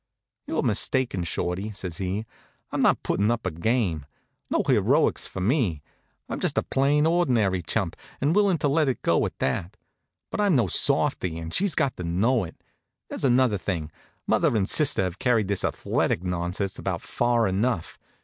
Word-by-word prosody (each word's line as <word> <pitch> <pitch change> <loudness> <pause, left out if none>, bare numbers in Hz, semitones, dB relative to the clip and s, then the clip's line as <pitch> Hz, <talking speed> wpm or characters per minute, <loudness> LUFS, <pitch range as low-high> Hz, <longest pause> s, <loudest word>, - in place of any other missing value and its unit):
"You're - - -1
mistaken, 125 -9 0
Shorty," 90 +4 -2
says 90 -4 -5
he. 95 +3 -3 0.5
"I'm - - -1
not - - +3
putting 100 +3 +1
up 115 -2 -1
a 90 - 0
game. 85 - -1 0.4
No - - +1
heroics - - +2
for 95 - -6
me. 100 - +1 0.4
I'm - - -4
just - - -1
a - - +3
plain, 145 +3 +2
ordinary 125 - +2
chump, 80 - -2 0.2
and 145 +6 +1
willing 200 -4 +3
to 145 - 0
let 150 +1 +2
it 130 - -3
go - - +3
at - - -11
that. 90 +10 -2 0.5
But - - -1
I'm 200 -5 +3
no 120 -5 +3
softy, 85 -1 +1
and 80 0 -6
she's 195 -2 +2
got 140 -5 0
to 90 - -5
know 100 +8 +1
it. 80 - -13 0.5
There's - - -5
another 125 -5 +3
thing: 85 -5 -3 0.3
mother 115 - +2
and 95 -2 +1
sister 145 -10 +3
have 90 0 -4
carried 115 -6 +2
this 100 -2 0
athletic 85 - 0
nonsense 90 +2 -3
about - - -3
far 120 -2 +1
enough. 95 -1 -1
105 Hz, 175 wpm, -25 LUFS, 90-130 Hz, 0.5 s, not